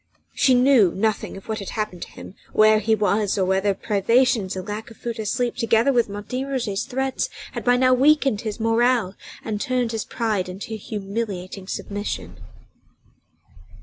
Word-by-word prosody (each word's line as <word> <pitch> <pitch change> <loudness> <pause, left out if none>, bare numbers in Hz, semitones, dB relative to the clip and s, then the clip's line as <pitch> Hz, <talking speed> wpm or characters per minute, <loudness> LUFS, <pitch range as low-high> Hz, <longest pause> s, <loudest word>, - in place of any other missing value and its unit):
She 260 -2 +4
knew 245 -7 +5
nothing 215 0 -1
of 195 - -13
what 220 -1 -2
had 200 - -6
happened 210 -5 -3
to - - -5
him, - - -11 0.2
where 215 0 +5
he 220 +1 +2
was, 205 -1 +1
nor 190 - +2
whether 190 +1 +1
privations 215 0 +2
and 185 0 -6
lack 210 +2 -5
of 225 - -14
food 235 -1 -5
or 220 - -3
sleep, 245 +2 -1
together 230 +3 +3
with 240 -3 +2
Martin 215 +7 -4
Roget's 235 -8 -2
threats, 265 0 -2 0.2
had - - -5
by 245 0 +4
now 255 0 +4
weakened 270 -4 +3
his 215 -1 -5
morale 225 -2 +2 0.3
and 210 -2 -3
turned 250 -2 0
his 225 -2 -2
pride 215 -6 -2
into 195 +4 -7
humiliating 200 -3 -5
submission. 205 +1 -5
220 Hz, 170 wpm, -23 LUFS, 200-245 Hz, 0.3 s, knew